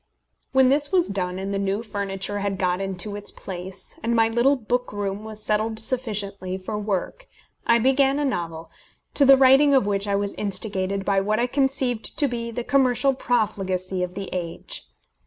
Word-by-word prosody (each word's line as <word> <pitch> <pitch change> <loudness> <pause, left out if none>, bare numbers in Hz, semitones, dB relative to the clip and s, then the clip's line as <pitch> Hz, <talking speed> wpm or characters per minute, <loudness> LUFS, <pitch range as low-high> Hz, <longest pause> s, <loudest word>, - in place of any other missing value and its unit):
When 265 -1 +5
this 285 +2 +2
was 365 -3 +2
done, 185 -2 -2
and 195 +1 -4
the 195 - -1
new 200 +2 -1
furniture 200 -1 -3
had 200 -1 -2
got 180 0 0
into 195 +1 -3
its 205 0 -2
place, 185 0 -7
and 235 +1 0
my 225 -1 +4
little 240 +5 +3
book 245 0 -2
room 205 0 -3
was 215 -1 -6
settled 215 +1 0
sufficiently 210 -6 -2
for 190 +3 -5
work, 210 - -3 0.4
I 235 - +6
began 270 +3 +3
a 295 - 0
novel, 165 -9 -3 0.4
to 280 - +4
the 270 0 +8
writing 270 +2 +6
of 260 - +4
which 200 0 0
I 200 - +1
was 200 0 -1
instigated 195 -1 -2
by 195 -1 +2
what 215 +3 0
I 240 - +2
conceived 260 -3 0
to 290 - +4
be 235 -2 -4
the 235 +1 -4
commercial 270 0 +3
profligacy 195 -7 -1
of 180 0 -3
the 195 -1 -5
age. 170 -2 -5
210 Hz, 185 wpm, -24 LUFS, 195-250 Hz, 0.4 s, the